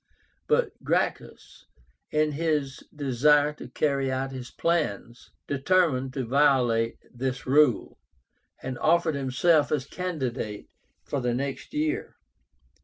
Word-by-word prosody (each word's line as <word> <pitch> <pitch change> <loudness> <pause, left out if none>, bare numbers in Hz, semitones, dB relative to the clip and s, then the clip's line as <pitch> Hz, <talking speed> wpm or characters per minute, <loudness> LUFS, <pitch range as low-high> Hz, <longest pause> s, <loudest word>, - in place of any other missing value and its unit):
But - - 0
Gracchus, - - -2 0.4
in 155 0 +1
his 150 -3 -1
desire 145 +2 +3
to - - -10
carry 135 +1 0
out 135 +1 -2
his 130 -2 -7
plans, 125 - -2 0.2
determined 140 -2 +1
to 130 -3 -2
violate 125 -4 +2 0.2
this 125 +1 -3
rule, 135 -3 +3 0.6
and 130 -1 -5
offered 170 0 +3
himself 140 +3 +2
as 145 -3 0
candidate 130 - -4 0.4
for 140 - -3
the 120 -1 0
next 135 +1 -4
year. 310 +6 -1
140 Hz, 110 wpm, -26 LUFS, 130-150 Hz, 0.6 s, desire